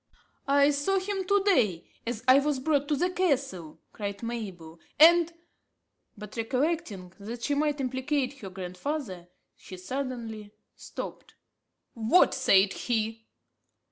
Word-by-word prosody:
"I 280 +1 +5
saw 290 +7 0
him 385 0 -3
to 400 +1 +2
day, 240 - +2 0.2
as 235 -1 -3
I 260 +2 +8
was 290 0 0
brought 285 +1 0
to 300 - +1
the 360 +5 0
castle," 270 - -1
cried 200 0 -5
Mabel, 190 -9 -6 0.2
"and 340 +1 +7 0.4
" - - -49
but 210 0 -10
recollecting 230 - -2
that 230 +4 -7
she 290 - 0
might 295 0 0
implicate 265 +1 -2
her 195 - -7
grandfather, 185 - -5 0.3
she 185 - -11
suddenly 225 -1 -5 0.2
stopped. - - -8 0.6
"What 235 +11 +4
said 195 -7 +4
he? 225 -1 -2
255 Hz, 130 wpm, -28 LUFS, 205-295 Hz, 0.6 s, I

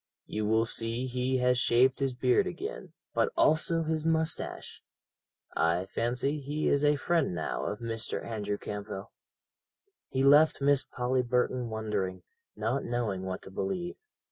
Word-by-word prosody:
You 105 0 -2
will 110 +1 +3
see 115 +2 0
he 130 +1 0
has 125 0 +3
shaved 125 +2 +4
his 135 -2 0
beard 130 +10 +3
again, 445 +6 -6 0.2
but 465 - +2
also 165 +1 +3
his 160 -1 -1
moustache. 160 0 -1 0.7
I 85 +3 +2
fancy 125 +8 -1
he 145 +2 -2
is 140 0 +2
a 150 0 +4
friend 145 - 0
now 80 -2 -3
of 105 +2 -4
Mr. 115 -1 -2
Andrew 105 -3 -3
Campbell." 100 0 -6 1.0
He 130 0 0
left 145 +3 +6
Miss 140 -1 +3
Polly 125 +1 -1
Burton 125 0 0
wondering, 105 -5 -3 0.3
not 115 +6 -1
knowing 110 -6 -2
what 95 0 -4
to - - -11
believe. 180 - -3
125 Hz, 145 wpm, -29 LUFS, 110-145 Hz, 1.0 s, left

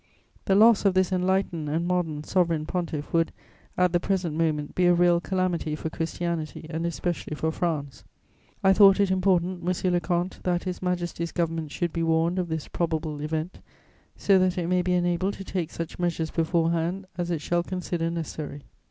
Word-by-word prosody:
The 195 - +3
loss 220 +1 +6
of 195 -2 +3
this 185 0 +2
enlightened 185 -4 0
and 165 +3 0
modern 165 -5 -1
Sovereign 165 -3 +1
Pontiff 165 -4 -4
would, 165 0 +2 0.5
at 180 -1 +3
the 175 - +4
present 180 -4 -1
moment, 155 -3 0
be 180 -1 +3
a 175 - +5
real 175 0 +4
calamity 180 -4 -1
for 160 +1 -5
Christianity 165 -1 -3
and 165 +1 -2
especially 170 -2 -3
for 160 +1 -1
France. 155 -5 -3 0.6
I 190 0 +6
thought 195 0 +7
it 200 -2 +3
important, 185 -1 +1
monsieur 180 +1 0
le 175 - +3
comte, 175 +1 -2
that 175 -1 0
His 180 -1 -4
Majesty's 175 -2 -2
Government 165 -2 -2
should 170 +2 -2
be 170 - -1
warned 165 +2 +2
of 180 - -1
this 160 -2 -3
probable 160 -3 -2
event, 160 +3 -3 0.6
so 195 -2 +4
that 185 0 +1
it 175 - -1
may 180 +1 +2
be 180 0 0
enabled 175 +2 +1
to 195 - -8
take 180 -4 -3
such 165 +1 -6
measures 170 -2 -1
beforehand 165 +2 0
as 175 0 -1
it 165 -3 -1
shall 175 +3 +1
consider 175 -2 -2
necessary. 155 -3 -5
175 Hz, 185 wpm, -26 LUFS, 160-180 Hz, 0.6 s, thought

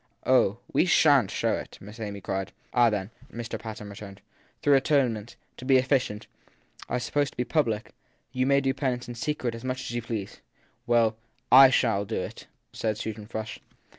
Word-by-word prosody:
Oh, 120 -5 +4 0.2
we - - +4
shan 145 - +5
t - - -7
show - - +1
it! - - -5
Miss 105 +4 -12
Amy 100 -2 -5
cried. 95 +1 -3 0.2
Ah, 120 -1 +5
then, 105 -1 -3 0.2
Mr. 115 0 -5
Patten 110 -2 -7
returned, 100 -1 -10 0.4
though 145 - +5
atonements, 125 -5 +1 0.2
to - - -10
be 130 0 +5
efficient, 130 -5 0 0.6
are 125 - 0
supposed 145 +3 -1
to - - -30
be 125 - 0
public, 115 -9 0 0.4
you 130 +1 0
may 140 0 +4
do 135 0 +1
penance 125 -4 -2
in 120 - -6
secret 125 -1 -2
as 115 +1 -8
much 130 0 -3
as - - -5
you 120 0 -2
please! 110 -3 -5 0.5
Well, 115 -2 +3 0.3
/ 135 +1 +9
shall 115 -6 +2
do 110 - -3
it, - - -7 0.3
said 110 -2 -2
Susan 110 -1 -6
Frush. 110 -1 -5
120 Hz, 185 wpm, -27 LUFS, 105-130 Hz, 0.6 s, /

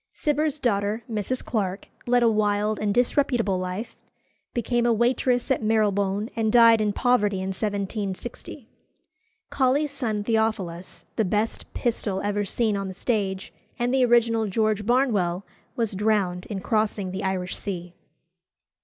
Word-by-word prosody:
Cibber's 300 0 0
daughter, 215 -4 0
Mrs. 230 +3 -3
Clarke, 195 -4 -2 0.2
led 245 0 +4
a - - +5
wild 210 -1 +1
and 210 -1 0
disreputable 240 -4 +1
life, 185 +5 -5 0.6
became 240 0 0
a - - +4
waitress 245 +2 +1
at 265 - +2
Marylebone, 205 -2 +1
and 220 -1 +1
died 230 -1 +7
in 210 -1 +1
poverty 210 -4 +2
in 190 0 -3
1760. 205 +4 -4 0.8
Colley's 275 +2 +2
son 225 -7 -2
Theophilus, 210 -6 -2
the 220 - +3
best 210 +4 -2
Pistol 215 -5 -1
ever 205 0 0
seen 215 +2 0
on 195 -1 -3
the 190 - -7
stage, 195 -4 -2 0.2
and 245 +1 0
the 265 -1 +4
original 230 -2 +3
George 215 +1 0
Barnwell, 205 -8 +1 0.3
was 230 -4 -1
drowned 195 -3 0
in 200 -3 -4
crossing 210 -3 0
the 190 - -4
Irish 185 -1 -2
Sea. 180 -3 -6
215 Hz, 140 wpm, -25 LUFS, 200-240 Hz, 0.8 s, died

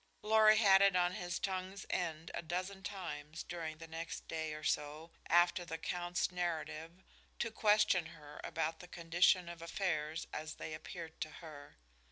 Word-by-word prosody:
Lorry 215 0 +7
had 195 -3 +7
it 200 -1 +6
on 180 0 +3
his 175 -1 -3
tongue's 190 0 -3
end 165 -2 -2
a - - -2
dozen 185 +4 -3
times 165 -5 -5
during 160 -3 -5
the 165 0 -9
next 165 +1 -6
day 160 -1 -3
or 155 0 -6
so 150 +3 -1 0.2
after 175 +1 +5
the 160 -2 -5
count's 175 +2 -1
narrative 170 0 -3 0.3
to 230 - -1
question 210 -6 +4
her 150 -2 -11
about 160 0 -2
the 180 - -10
condition 175 +1 +3
of 170 -1 -8
affairs 165 -3 -1
as 155 0 -4
they 155 - -6
appeared 160 +1 -8
to 155 - -1
her. 155 - -11
170 Hz, 165 wpm, -36 LUFS, 160-185 Hz, 0.3 s, Lorry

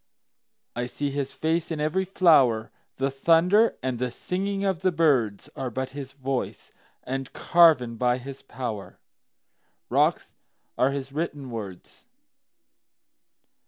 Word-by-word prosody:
I 120 +1 -2
see 140 +3 -3
his 140 -1 -3
face 160 +1 -1
in 160 -2 -3
every 155 +6 0
flower; 140 - +4 0.2
The 135 +1 -1
thunder 170 +10 +3
and 130 -2 -2
the 125 0 -1
singing 195 +9 -3
of 190 -3 0
the 185 -1 +2
birdsAre 130 - 0
but 130 +2 -3
his 135 -1 -8
voice—and 135 0 -5
carven 150 -9 +4
by 125 +1 +2
his 135 +2 -9
powerRocks 115 -7 -4 0.4
are 130 - +3
his 140 -1 -4
written 145 -3 -4
words. 105 - -8
135 Hz, 115 wpm, -26 LUFS, 125-165 Hz, 0.4 s, flower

